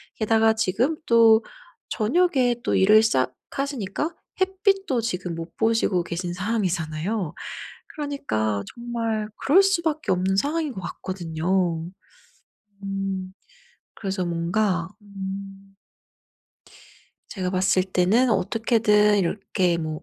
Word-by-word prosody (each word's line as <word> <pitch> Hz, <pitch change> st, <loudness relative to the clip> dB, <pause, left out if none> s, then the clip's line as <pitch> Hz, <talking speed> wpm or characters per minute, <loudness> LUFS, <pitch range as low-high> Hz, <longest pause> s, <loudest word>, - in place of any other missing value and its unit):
게다가 220 Hz, 0 st, +3 dB
지금 220 Hz, +7 st, 0 dB
또 230 Hz, -1 st, +6 dB, 0.5 s
저녁에 255 Hz, 0 st, +2 dB
또 -, -, 0 dB
일을 215 Hz, +3 st, +6 dB
시작하시니까 220 Hz, -, -2 dB, 0.2 s
햇빛도 380 Hz, -, +1 dB
지금 180 Hz, -6 st, -3 dB
못 165 Hz, 0 st, -8 dB
보시고 225 Hz, -5 st, +2 dB
계신 175 Hz, +1 st, -4 dB
상황이잖아요. 180 Hz, -2 st, -2 dB, 0.6 s
그러니까 110 Hz, -, -2 dB
정말 230 Hz, -3 st, -3 dB
그럴 365 Hz, +8 st, +5 dB
수밖에 335 Hz, -, 0 dB
없는 185 Hz, +1 st, +1 dB
상황인 300 Hz, +4 st, 0 dB
것 190 Hz, -, -7 dB
같거든요. 170 Hz, -1 st, -2 dB, 1.0 s
음 195 Hz, -1 st, -3 dB, 0.6 s
그래서 190 Hz, -3 st, -3 dB
뭔가 175 Hz, +1 st, 0 dB
음 195 Hz, 0 st, -8 dB, 1.5 s
제가 185 Hz, -4 st, -3 dB
봤을 185 Hz, 0 st, +2 dB
때는 195 Hz, +7 st, +2 dB
어떻게든 210 Hz, -1 st, +3 dB
이렇게 185 Hz, -1 st, 0 dB
뭐 155 Hz, -1 st, -4 dB
200 Hz, 230 characters per minute, -24 LUFS, 180-235 Hz, 1.5 s, 또